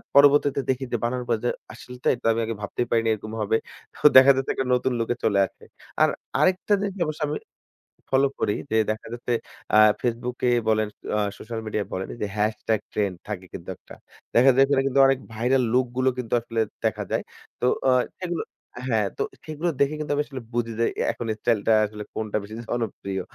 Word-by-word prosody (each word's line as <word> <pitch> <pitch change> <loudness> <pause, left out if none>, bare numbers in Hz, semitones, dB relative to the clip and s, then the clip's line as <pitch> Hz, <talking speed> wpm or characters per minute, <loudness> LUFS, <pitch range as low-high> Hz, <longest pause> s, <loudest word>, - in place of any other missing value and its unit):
পরবর্তীতে 140 0 +6
দেখি 130 0 +1
যে - - +3
বানানোর 125 +1 -1
পর 115 - +3
যে, - - +3 0.2
"আসলে 125 0 -11
তাই - - +3
তো, - - -15
আমি 115 - 0
আগে 115 0 -3
ভাবতেই 120 +3 -2
পারিনি 115 -1 +2
এরকম 110 +1 -7
হবে।" 105 +1 +2 0.4
তো - - -5
দেখা 130 +1 +9
যাচ্ছে 135 0 -1
একটা 135 - -2
নতুন 125 +1 +1
লুকে 115 +1 0
চলে 100 -2 +3
আসে। - - -24 0.4
আর - - +6 0.3
আরেকটা 185 +3 +2
জিনিস 200 -1 -2
অবশ্য 155 0 -5
আমি 150 - -2 0.7
ফলো 135 +1 +4
করি 105 - +1 0.2
যে, - - +1 0.2
দেখা 110 - -6
যাচ্ছে 120 0 -2 0.4
আ - - +8 0.2
ফেসবুকে 125 +1 -1 0.2
বলেন, 110 -1 +2 0.3
আ - - +2 0.2
সোশ্যাল 115 0 -6
মিডিয়া 105 -1 -1
বলেন, 95 +1 -3
এইযে 110 -3 -3
হ্যাশট্যাগ 110 +1 0
ট্রেন্ড 100 -3 0
থাকে 100 -3 -5
কিন্তু 85 - -8
একটা। - - -14 0.4
দেখা 125 +3 +7
যায় 135 - +6
ওইখানে 140 -1 +3
কিন্তু 135 0 +2
অনেক 135 -1 +2
ভাইরাল 125 +4 +2
লুক 130 +1 +4
গুলো 130 0 +3
কিন্তু 125 -3 -4
আসলে 115 -1 -2 0.2
দেখা - - 0
যায়। - - 0 0.4
তো - - 0 0.2
অ - - +6 0.3
সেগুলো 175 -2 -2 0.5
হ্যাঁ, 110 -4 +2
তো - - -3 0.2
সেগুলো 155 +2 -2
দেখে 140 +2 +2
কিন্তু 150 -1 -3
আমি 145 - +1
আসলে 135 -3 -7
বুঝি 120 -1 -1
যে, 115 - +3
অ্যা - - 0
এখন 120 - -6
স্টাইলটা 115 -1 +1
আসলে 105 0 -7
কোনটা 110 -1 -2
বেশি 105 +2 -9
জনপ্রিয়। 100 -5 -3
120 Hz, 200 wpm, -25 LUFS, 110-135 Hz, 0.7 s, দেখা